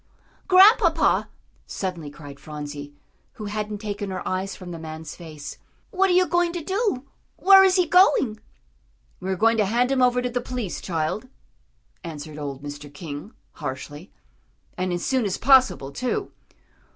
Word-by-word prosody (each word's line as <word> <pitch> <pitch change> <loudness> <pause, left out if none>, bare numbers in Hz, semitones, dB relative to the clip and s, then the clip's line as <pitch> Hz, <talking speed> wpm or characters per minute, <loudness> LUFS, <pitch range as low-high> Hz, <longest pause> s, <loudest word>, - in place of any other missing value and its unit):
"Grandpapa," 385 +5 +5 0.4
suddenly 175 -6 -4
cried 145 -2 -11
Phronsie, 145 -1 -7 0.4
who 215 - -8
hadn't 210 0 -3
taken 205 -1 -5
her 185 - -5
eyes 190 +1 -2
from 180 -2 -9
the 165 - -7
man's 160 0 -8
face, 155 -4 -9 0.3
"what 385 0 +2
are - - +3
you 365 +1 +5
going 350 -1 +1
to 345 -3 -4
do 385 - -1 0.3
where 385 0 +8
is 380 -1 +4
he 365 -2 +3
going?" 300 - +4 0.8
"We 185 - -5
are 190 - +1
going 225 +4 +3
to 210 - +3
hand 240 +6 +1
him 265 -1 +2
over 250 0 +4
to 250 - -1
the 245 0 -1
police, 245 -6 -4
child," 170 +7 -2 0.8
answered 155 -2 -7
old 140 -1 -6
Mr. 145 0 -8
King, 145 - -8 0.2
harshly. 145 +6 -7 0.6
"And 185 0 -2
as 175 0 -2
soon 260 -2 +1
as 195 -3 -1
possible, 255 - +4
too." 255 - -3
205 Hz, 160 wpm, -24 LUFS, 155-260 Hz, 0.8 s, where